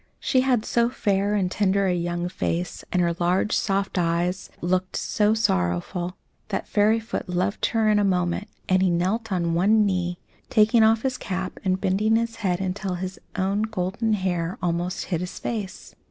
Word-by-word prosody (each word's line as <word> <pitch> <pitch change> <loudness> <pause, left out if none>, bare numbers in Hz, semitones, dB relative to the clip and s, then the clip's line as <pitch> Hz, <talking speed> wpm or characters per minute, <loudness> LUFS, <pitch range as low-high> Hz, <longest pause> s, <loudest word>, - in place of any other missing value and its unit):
She 255 - +2
had 250 -4 +1
so 235 0 +2
fair 205 -3 0
and 185 -3 0
tender 200 0 +2
a 185 - +2
young 175 0 -2
face, 175 -1 -3
and 180 -1 +2
her 170 0 +1
large, 180 +4 +1
soft 195 -2 0
eyes, 175 +2 0
yet - - -19
looked 185 +1 0
so 210 +1 +1
sorrowful, 135 - -1 0.3
that - - -3
Fairyfoot 215 -1 +1
loved 180 +3 0
her 225 -2 +1
in 210 -1 +4
a - - +2
moment, 180 +1 0 0.2
and 185 0 +3
he 190 - +3
knelt 195 +6 0
on 170 -3 0
one 210 +5 +4
knee, 180 -3 -1 0.3
taking 220 +1 +4
off 220 0 +4
his 260 -1 -1
cap 185 -1 -4
and 185 -1 +1
bending 210 +4 +2
his 230 0 -1
head 185 -5 0
until 190 0 -2
his 185 +1 -5 0.2
own 195 +2 0
golden 220 +1 -1
hair 180 -3 -1
almost 175 +1 -2
hid 165 - 0
his 180 - -5
face. 210 -5 -5
190 Hz, 180 wpm, -24 LUFS, 180-215 Hz, 0.3 s, in